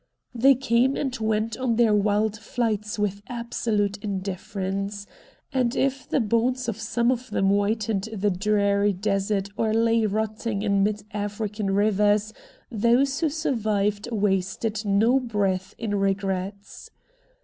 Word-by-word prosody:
They 265 +3 +5
came 255 +1 +2
and 265 -3 -2
went 220 0 0
on 255 -3 0
their 225 -2 +4
wild 210 +1 +2
flights 215 -2 -2
with 205 -1 -1
absolute 225 -4 -1
indifference, 195 0 -4 0.5
and 250 -1 +1
if 270 0 -1
the - - +2
bones 240 +3 +1
of 225 -2 -3
some 235 +2 +1
of 255 0 -3
them 195 - +1
whitened 205 +1 0
the 205 -1 0
drear 200 +1 +2
desert 195 0 -1
or 220 -1 +1
lay 230 -1 +3
rotting 215 0 -2
in 200 -2 +2
mid 210 0 -1
African 205 0 -3
rivers 210 +1 +2 0.4
those 245 +5 +2
who 320 -2 +1
survived 215 -8 -1
wasted 205 +1 -1
no 220 +6 +3
breath 200 -5 -1
in 220 -3 -3
regrets. 195 0 -2
210 Hz, 130 wpm, -25 LUFS, 200-230 Hz, 0.5 s, They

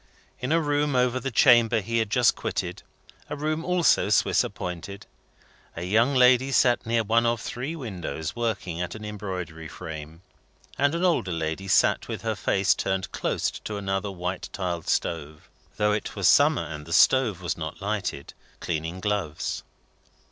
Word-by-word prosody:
In 125 +3 -3
a 165 - +4
room 145 -2 0
over 125 0 +2
the 135 +2 -3
chamber 120 -2 +5
he 115 +3 -1
had 110 -2 -1
just 120 +2 +3
quitted - - -4 0.5
a 145 - -3
room 155 +2 -2
also 180 -1 +3
Swiss - - +3
appointed 90 +3 -6 0.7
a 85 - -5
young 115 +9 +2
lady 130 +1 +5
sat 120 -3 +3
near 115 0 +2
one 115 +2 +2
of 115 0 +1
three 130 +8 -5
windows, 90 - -5
working 100 -7 -2
at 90 +2 -4
an 110 -1 -8
embroidery 90 -6 -6
frame; 80 0 -9 0.5
and 145 +3 +1
an 175 +2 0
older 165 - +1
lady 80 +3 -3
sat 95 - +3
with - - -5
her - - 0
face 95 0 +2
turned 95 -1 -2
close - - -1
to 105 - -6
another 95 0 -2
white 90 0 -4
tiled 90 -4 -4
stove 75 -2 -2 0.3
(though 105 0 +2
it 105 0 -3
was - - +2
summer, - - +5
and 75 -1 -8
the 85 - -4
stove 120 -3 +4
was 90 - -1
not 80 -1 -6
lighted), 100 -1 -3 0.3
cleaning 80 +2 -3
gloves. 100 -7 -2
105 Hz, 165 wpm, -26 LUFS, 90-125 Hz, 0.7 s, chamber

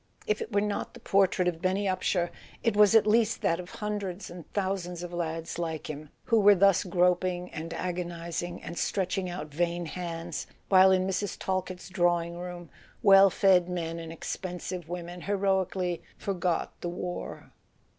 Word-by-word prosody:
If 210 - 0
it - - -5
were 200 -1 +2
not 210 -1 -3
the - - -10
portrait 190 -2 +2
of 170 -2 -1
Benny 190 +2 +1
Upsher 185 -2 0 0.3
it 230 -3 +2
was 210 +1 +6
at 220 - +7
least 225 +1 +2
that 170 +1 +2
of 180 0 -7
hundreds 205 -3 -4
and 175 -3 -11
thousands 185 -3 -2
of 175 0 -7
lads 165 -1 -3
like 160 -2 -3
him, 150 0 -9
who 230 -2 +3
were 205 0 +7
thus 195 0 +4
groping 180 0 +1
and 160 +1 -6
agonizing 175 -1 -4
and 170 - -5
stretching 185 -1 -1
out 175 -3 -5
vain 175 +2 0
hands, 170 -1 -5 0.2
while 190 0 +7
in 185 0 +3
Mrs. 190 0 -2
Talkett's 185 -1 -3
drawing 175 -2 +1
room 175 -1 -7 0.3
well 195 -1 +8
fed 180 -1 +4
men 170 -2 -3
and 165 -1 -7
expensive 175 0 -5
women 175 0 -6
heroically 190 -2 0 0.2
"forgot 180 -3 -1
the 175 - -2
war." 175 0 -6
180 Hz, 165 wpm, -29 LUFS, 170-195 Hz, 0.3 s, well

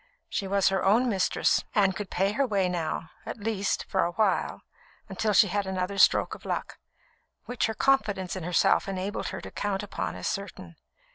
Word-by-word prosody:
She 195 - -2
was 195 0 +3
her 190 -1 0
own 230 +6 +4
mistress, 195 -4 +1
and 195 -2 +3
could 205 -1 -5
pay 195 +2 +1
her 270 +5 +1
way 200 -4 +1
now 165 -2 -3
at - - -6
least, 205 -2 -1
for 190 - +1
awhile, 190 +3 0 0.4
until 210 +2 -1
she 210 - +6
had 200 0 -2
another 190 +1 -2
stroke - - +4
of - - -10
luck, - - -4 0.7
which 245 -1 -1
her 220 - -4
confidence 205 -10 +1
in 185 - -5
herself 175 +3 +2
enabled 195 +1 -3
her - - -5
to - - -9
count 205 -1 -2
upon 205 - -4
as - - -4
certain. 170 - -5
195 Hz, 185 wpm, -27 LUFS, 185-210 Hz, 0.7 s, she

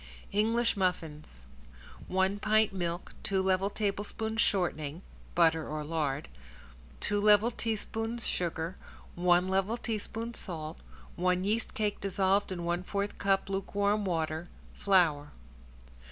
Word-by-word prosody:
~ENGLISH 230 +3 +2
MUFFINS~ 155 - -2 0.6
One 190 +2 +1
pint 215 0 +3
milk, 175 -1 -3
two 195 -1 +1
level 190 +1 +2
tablespoons 215 +2 -2
shortening 170 -4 0 0.3
(butter 160 -2 +4
or 150 0 -3
lard), 150 - -1 0.7
two 205 0 +1
level 210 +2 +5
teaspoons 225 0 -3
sugar, 170 0 -2 0.4
one 175 +1 +3
level 195 +4 +1
teaspoon 225 0 -4
salt, 160 -6 -5 0.4
one 180 +1 +1
yeast 220 +3 -1
cake 210 -1 -1
dissolved 195 0 +1
in 175 -2 -3
one 175 +1 0
fourth 200 +2 -3
cup 195 -1 +2
lukewarm 200 +2 0
water, 165 -2 -2 0.2
flour. 160 -7 +2
190 Hz, 115 wpm, -31 LUFS, 170-210 Hz, 0.7 s, level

